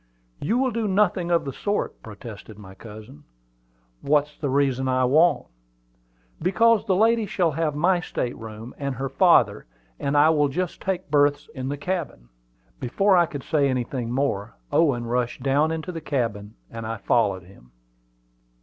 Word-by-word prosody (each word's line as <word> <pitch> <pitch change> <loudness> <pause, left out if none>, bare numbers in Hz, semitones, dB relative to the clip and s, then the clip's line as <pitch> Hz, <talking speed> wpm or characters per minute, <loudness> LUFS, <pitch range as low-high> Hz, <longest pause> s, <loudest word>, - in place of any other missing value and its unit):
"You 220 +11 0
will 260 0 +1
do 225 -1 -1
nothing 190 -3 +1
of 170 -3 +2
the 135 - -4
sort," 205 +8 -3
protested 110 -1 -10
my 95 -3 -12
cousin. 110 +8 -12 0.8
"What's 150 +1 +1
the 145 - -3
reason 130 -1 +1
I 130 0 +2
won't?" 160 +7 +3 1.0
"Because 215 +5 +3
the 190 - +3
lady 225 +2 +3
shall 175 -5 +1
have 155 0 -1
my 175 +4 +2
state 125 -7 -3
room; 110 +1 -9
and 140 -2 -3
her 135 +2 -3
father 135 - +3 0.3
and 140 +1 0
I 150 +2 +6
will 150 -2 +3
just 175 +5 -3
take 185 -5 -3
berths 145 -1 +2
in 130 0 -4
the 145 - -3
cabin." 145 - -4 0.5
Before 195 +11 +2
I 175 -2 +4
could 145 -4 -7
say 145 -3 +1
anything 125 -1 -2
more, 120 -6 -2 0.2
Owen 135 -8 +2
rushed 120 +1 -2
down 140 +3 +2
into 160 +2 -4
the 165 -2 -6
cabin, 115 -8 -3 0.2
and 115 -1 -6
I 115 0 -3
followed 100 -3 +1
him. 85 -10 -19
140 Hz, 165 wpm, -24 LUFS, 120-170 Hz, 1.0 s, I